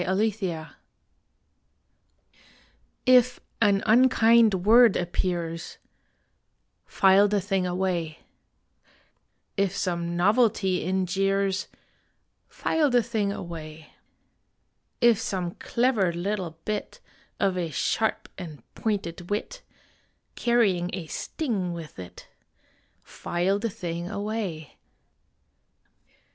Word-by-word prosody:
ON 195 +5 +1
FILE 175 -6 -4 2.4
IF 250 -1 +5 0.2
an 200 -2 +3
unkind 225 -4 +4
word 230 0 +6
appears, 170 -1 -3 1.1
File 195 +1 +5
the 205 0 +1
thing 195 -1 -1
away. 175 -3 -2 1.4
If 195 -1 0
some 170 -2 -2
novelty 195 -1 +2
in 185 +1 0
jeers, 195 +1 0 0.8
File 310 -3 0
the 245 -2 +3
thing 215 -3 -1
away. 160 -4 -8 1.1
If 235 -3 +5
some 185 -5 -3
clever 235 -7 +1
little 175 -1 -3
bit 215 -1 -4 0.4
Of 195 -2 +1
a 175 -2 -2
sharp 220 +7 -1
and 160 -6 -9
pointed 180 -5 -3
wit, 225 - -3 0.7
Carrying 205 -8 +1
a 185 -4 -4
sting 195 - -3
with 165 - -9
it 90 -1 -11 0.8
File 185 +4 -1
the 230 - -2
thing 175 -2 -5
away. 200 -7 -4
195 Hz, 90 wpm, -26 LUFS, 175-215 Hz, 2.4 s, word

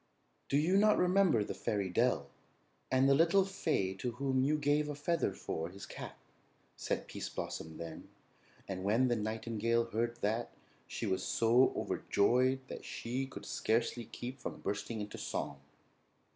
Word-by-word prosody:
"Do 140 - +3
you 170 +6 +3
not 210 +1 +5
remember 180 - +4
the - - -4
fairy 100 -3 -1
dell 90 - +2 0.6
and 130 +1 +4
the 140 - +6
little 170 +6 +5
fay 155 - 0
to 120 +4 -3
whom 130 +1 +1
you 150 +3 +2
gave 150 +1 +2
a 145 - -3
feather 155 -4 0
for 80 -3 -4
his 100 +2 -9
cap?" - - -8 0.6
said - - -2
Pease - - -5
Blossom 80 0 -5
then; 80 -1 -8 0.6
and 95 -1 -4
when 115 +6 +3
the 120 - +3
nightingale 115 +1 0
heard 120 +1 -1
that, 110 +3 0 0.4
she - - -4
was 95 - 0
so 120 +3 +4
overjoyed 130 +5 +2
that - - -7
she 130 +3 -3
could 100 -6 -9
scarcely 115 +2 0
keep 125 +5 -7
from - - -6
bursting 105 +2 -3
into 105 0 -6
song. 70 - -3
120 Hz, 160 wpm, -34 LUFS, 105-140 Hz, 0.6 s, the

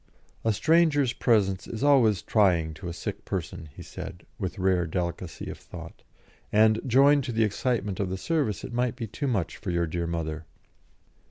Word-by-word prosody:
"A 115 - +3
stranger's 145 - +3
presence 95 -6 +1
is 115 +3 -5
always 120 -9 +4
trying 90 -7 +2
to 80 +3 -8
a - - -3
sick 85 - -5
person," 80 - -5
he - - -9
said, 85 - -8
with 95 +1 -3
rare 90 -2 +2
delicacy 85 0 -4
of - - -7
thought, 85 -2 -11 0.5
"and, 110 +1 +4
joined 140 +3 +5
to 125 - -3
the 115 -1 +2
excitement 105 -2 -1
of 100 -2 -1
the 95 - -3
service, 140 - -1
it 125 - -7
might 120 0 0
be 120 -3 -4
too 140 +7 -4
much 105 -10 -1
for 105 - -6
your 85 -1 +1
dear 85 +1 -3
mother. 80 -2 -4
105 Hz, 180 wpm, -27 LUFS, 85-120 Hz, 0.5 s, joined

